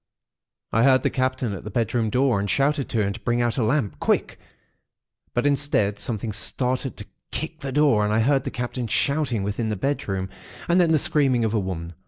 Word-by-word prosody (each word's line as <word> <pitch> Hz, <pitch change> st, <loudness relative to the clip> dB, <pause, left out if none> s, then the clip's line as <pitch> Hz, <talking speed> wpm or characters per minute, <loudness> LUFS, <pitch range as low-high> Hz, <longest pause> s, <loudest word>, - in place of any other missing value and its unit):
I 115 Hz, -, +2 dB
heard 130 Hz, +1 st, +5 dB
the -, -, +1 dB
Captain 130 Hz, -3 st, -1 dB
at 95 Hz, -, -7 dB
the 105 Hz, -, -6 dB
bedroom 115 Hz, +1 st, 0 dB
door, 125 Hz, -2 st, +2 dB
and 100 Hz, 0 st, -2 dB
shouted 140 Hz, +4 st, +1 dB
to 115 Hz, -, 0 dB
him 100 Hz, 0 st, -1 dB
to 115 Hz, -, -9 dB
bring 120 Hz, +1 st, 0 dB
out 120 Hz, 0 st, 0 dB
a -, -, +2 dB
lamp, 110 Hz, -, 0 dB
quick; -, -, 0 dB, 1.0 s
but 120 Hz, -, +1 dB
instead, 140 Hz, -8 st, +1 dB
something 110 Hz, -1 st, -3 dB
started 130 Hz, +5 st, -1 dB
to 105 Hz, -, -7 dB, 0.2 s
kick 160 Hz, 0 st, -4 dB
the 135 Hz, -1 st, -5 dB
door, 140 Hz, -6 st, +3 dB
and 105 Hz, -, 0 dB
I 110 Hz, +1 st, +2 dB
heard 135 Hz, +3 st, +2 dB
the 135 Hz, -, -3 dB
Captain 125 Hz, -1 st, -4 dB
shouting 135 Hz, -2 st, 0 dB
within 105 Hz, +3 st, -2 dB
the 105 Hz, -, -1 dB
bedroom, 95 Hz, -5 st, -2 dB, 0.4 s
and 175 Hz, +1 st, +4 dB
then 170 Hz, -2 st, +3 dB
the 160 Hz, -, +5 dB
screaming 135 Hz, -5 st, +2 dB
of 110 Hz, -, 0 dB
the 110 Hz, -, +1 dB
women. 90 Hz, -3 st, -5 dB
120 Hz, 210 wpm, -24 LUFS, 105-140 Hz, 1.0 s, heard